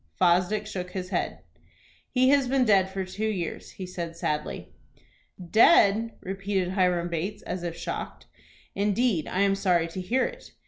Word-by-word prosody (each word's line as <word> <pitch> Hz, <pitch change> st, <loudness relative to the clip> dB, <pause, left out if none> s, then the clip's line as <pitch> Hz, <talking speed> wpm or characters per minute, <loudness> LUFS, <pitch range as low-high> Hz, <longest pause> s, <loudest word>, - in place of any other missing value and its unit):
Fosdick 185 Hz, +4 st, +3 dB
shook 180 Hz, -3 st, -5 dB
his 185 Hz, -1 st, -4 dB
head. -, -, -2 dB, 0.7 s
"He 255 Hz, 0 st, +3 dB
has 275 Hz, -2 st, +4 dB
been 260 Hz, 0 st, +2 dB
dead 195 Hz, -4 st, +4 dB
for 190 Hz, 0 st, -4 dB
two 205 Hz, +4 st, -3 dB
years," 185 Hz, -6 st, -4 dB
he 190 Hz, -, -7 dB
said, 170 Hz, -2 st, -6 dB
sadly. 150 Hz, -2 st, -3 dB, 0.8 s
"Dead!" 225 Hz, -2 st, +5 dB
repeated 195 Hz, -1 st, -2 dB
Hiram 180 Hz, -2 st, +1 dB
Bates, 175 Hz, +5 st, -4 dB
as 180 Hz, 0 st, -4 dB
if 170 Hz, -1 st, -5 dB
shocked. -, -, -6 dB, 0.5 s
"Indeed, 205 Hz, -3 st, +1 dB
I 185 Hz, -, -1 dB
am 200 Hz, -1 st, +4 dB
sorry 180 Hz, -4 st, +2 dB
to 185 Hz, +3 st, -5 dB
hear 235 Hz, +9 st, +1 dB
it." -, -, -8 dB
190 Hz, 155 wpm, -26 LUFS, 180-215 Hz, 0.8 s, Dead